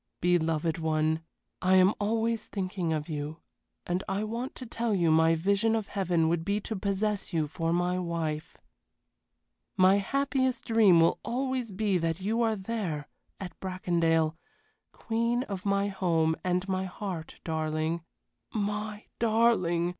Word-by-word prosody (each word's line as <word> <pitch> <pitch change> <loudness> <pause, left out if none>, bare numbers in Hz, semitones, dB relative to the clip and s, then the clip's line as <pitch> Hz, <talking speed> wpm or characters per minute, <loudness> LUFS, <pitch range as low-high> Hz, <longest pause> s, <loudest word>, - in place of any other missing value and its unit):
Beloved 165 -2 +1
one, 160 0 +1 0.4
I 185 +1 +4
am 185 +2 +6
always 225 +1 0
thinking 185 -4 -2
of 155 -1 -2
you, 150 0 -5 0.4
and 180 +2 -1
I 195 +2 -1
want 230 +4 -4
to 255 - -7
tell 230 -2 -1
you 170 -4 +3
my 160 +1 +5
vision 200 +6 +2
of 220 -3 -2
heaven 175 -5 +1
would 165 0 0
be 200 +4 0
to 220 - -4
possess 200 0 -1
you 160 -2 +2
for 165 +1 -2
my 175 +1 +1
wife. 165 -3 -3 1.2
My 185 +1 +6
happiest 260 +2 0
dream 210 -7 +5
will 165 - +3
always 255 +1 -2
be 195 -1 +1
that 165 +1 -1
you 220 +5 0
are 225 -1 +2
there 190 -8 -3 0.3
at 190 -2 -6
Bracondale 170 -4 +1 0.6
queen 235 +2 -1
of 200 -5 -5
my 200 0 +2
home 165 -4 +1
and 180 +1 0
my 190 0 -1
heart, 180 -3 -6
darling. 155 +1 -1 0.5
My 210 0 -3
darling! 215 -7 +3
185 Hz, 145 wpm, -29 LUFS, 165-215 Hz, 1.2 s, am